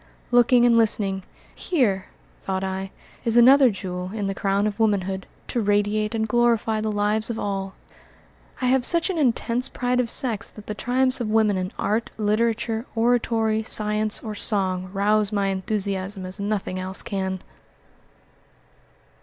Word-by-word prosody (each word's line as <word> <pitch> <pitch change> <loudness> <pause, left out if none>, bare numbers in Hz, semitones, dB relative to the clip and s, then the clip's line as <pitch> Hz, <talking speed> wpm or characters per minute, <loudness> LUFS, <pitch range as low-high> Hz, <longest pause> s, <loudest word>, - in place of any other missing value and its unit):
Looking 245 0 +5
and 235 -1 +5
listening, 200 -3 +2 0.3
"Here," 220 - 0 0.3
thought 190 0 -3
I, 190 0 -4 0.3
"is 230 0 +2
another 260 +2 +7
jewel 180 -3 -5
in 210 -2 -2
the 195 - -1
crown 195 +1 0
of 210 0 -3
womanhood, 195 -3 0 0.2
to 240 - -1
radiate 205 +1 0
and 220 0 -1
glorify 230 -1 +1
the 215 0 -1
lives 210 +2 +1
of 230 - -3
all." 195 -2 -4 0.9
I - - 0
have 255 0 +3
such 340 +7 +3
an 345 - -3
intense 250 -1 +1
pride 250 0 -1
of 245 -2 0
sex 230 -5 0
that 210 - -13
the 210 - -4
triumphs 255 +5 0
of 220 - -2
woman 215 -2 +2
in 185 +1 -3
art, 220 +3 -1
literature, 225 +2 0
oratory, 225 -2 +1
science, 215 0 +1
or 215 - -5
song 185 -3 0
rouse 210 +1 +2
my 200 -2 0
enthusiasm 195 0 -3
as 185 +3 -5
nothing 200 -2 -2
else 185 +1 -3
can. 190 -1 -3
215 Hz, 155 wpm, -23 LUFS, 195-235 Hz, 0.9 s, another